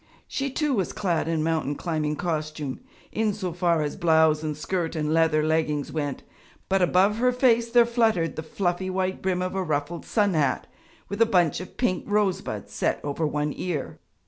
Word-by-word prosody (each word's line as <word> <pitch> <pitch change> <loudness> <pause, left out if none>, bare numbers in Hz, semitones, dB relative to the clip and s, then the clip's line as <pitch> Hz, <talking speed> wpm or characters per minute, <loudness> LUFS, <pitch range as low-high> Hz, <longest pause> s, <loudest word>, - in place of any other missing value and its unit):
She 275 0 -2
too 295 +1 0
was 195 -7 -1
clad 175 -5 0
in 165 -2 0
mountain 160 -3 0
climbing 155 -3 -2
costume, 155 -4 -3 0.3
in 215 -1 0
so 185 -5 -4
far 170 -2 +1
as 145 - -3
blouse 160 -4 +3
and 155 -2 -3
skirt 170 +1 -2
and 155 -1 0
leather 160 -2 +3
leggings 155 -2 0
went, 145 -4 -3 0.5
but 195 0 +2
above 190 +4 +3
her 250 +2 +3
face 235 -2 +3
there 240 0 +6
fluttered 225 -8 +1
the - - -3
fluffy 180 +2 -2
white 185 0 -1
brim 185 -1 0
of 185 - -3
a 190 - -1
ruffled 155 0 -2
sun 205 -3 +2
hat 145 -5 +1 0.4
with 200 +3 -4
a 230 - +6
bunch 175 -8 +2
of 185 - -10
pink 195 -8 0
rosebuds 205 -3 -1
set - - 0
over 150 +2 -1
one 150 0 -1
ear. 160 -3 -4
170 Hz, 185 wpm, -25 LUFS, 155-195 Hz, 0.5 s, there